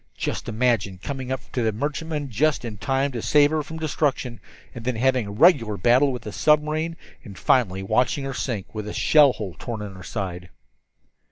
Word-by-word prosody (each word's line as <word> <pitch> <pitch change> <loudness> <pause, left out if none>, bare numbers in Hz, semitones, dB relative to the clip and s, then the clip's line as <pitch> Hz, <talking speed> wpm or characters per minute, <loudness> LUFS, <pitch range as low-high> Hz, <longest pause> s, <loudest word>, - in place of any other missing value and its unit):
Just - - -3
imagine 110 -4 0
coming 130 +5 -5
up 130 - -2
to 125 - -1
that 110 -2 0
merchantman 150 +2 -3
just 145 +4 +1
in 110 -3 -6
time 135 +1 0
to 120 -3 -4
save 145 +3 +4
her 155 -1 +1
from 160 +2 -8
destruction, 140 -6 -1 0.3
and 120 - -8
then 125 0 -1
having 130 -1 +1
a - - -6
regular 115 - +4
battle 125 +8 +4
with 125 -3 -6
the 105 - -6
submarine, 155 +4 +1 0.3
and 100 -7 -11
finally 95 -7 +2
watching 125 +7 +1
her 135 0 -4
sink, 115 -5 -4
with 105 -1 -5
a 105 - -5
shell 145 -4 +5
hole 95 -8 -6
torn 110 -3 -5
in 100 -2 -7
her 95 - -11
side!" 90 -2 -5
125 Hz, 195 wpm, -24 LUFS, 105-145 Hz, 0.3 s, shell